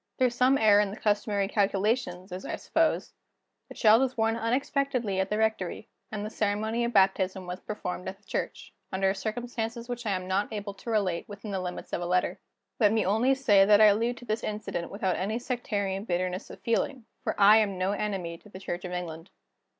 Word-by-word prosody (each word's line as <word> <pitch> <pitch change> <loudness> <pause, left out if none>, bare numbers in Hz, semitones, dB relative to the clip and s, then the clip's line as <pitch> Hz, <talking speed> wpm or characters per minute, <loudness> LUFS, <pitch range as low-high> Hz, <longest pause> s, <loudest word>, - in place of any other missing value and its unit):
Through 255 -2 +3
some 255 +3 +3
error 210 -3 +6
in 205 -1 +2
the 200 - -7
customary 205 -1 +1
calculations, 200 -2 0
as 185 +1 -6
I - - -3
suppose, - - 0 0.6
the - - -10
child 220 +2 +6
was 260 -1 0
born 225 0 +1
unexpectedly 245 -2 0
at 190 0 0
the 210 - 0
rectory; 220 -5 -1 0.2
and 210 -1 -4
the 215 - -5
ceremony 220 +3 0
of 235 - 0
baptism 190 -2 +2
was 180 0 -5
performed 180 -3 -5
at 190 - -8
the 205 - -34
church, - - -4 0.2
under 190 0 +1
circumstances 230 +2 -4
which 240 -2 -5
I 200 - +1
am 185 0 -5
not 195 +3 0
able 205 -2 -4
to 200 - -9
relate 200 -6 0
within 205 +1 -7
the 190 -1 -2
limits 180 -1 -6
of - - -1
a 175 - -2
letter: 180 +1 +1 0.4
Let 210 -4 +5
me 220 -2 +2
only 225 +8 +3
say 210 -8 +5
that 205 +1 +6
I 215 - +8
allude 235 +4 -1
to 245 - -11
this 215 0 -2
incident 210 -5 -4
without 190 -2 -1
any 210 +4 -1
sectarian 205 -6 -2
bitterness 180 0 -2
of - - -11
feeling 230 +1 -1 0.2
for - - -2
I 205 +2 +8
am 205 -3 +1
no 185 +2 0
enemy 190 -5 -3
to 210 - -17
the 190 - -10
Church 175 -2 -5
of 180 - -5
England. 170 -1 -5
205 Hz, 210 wpm, -28 LUFS, 190-225 Hz, 0.6 s, I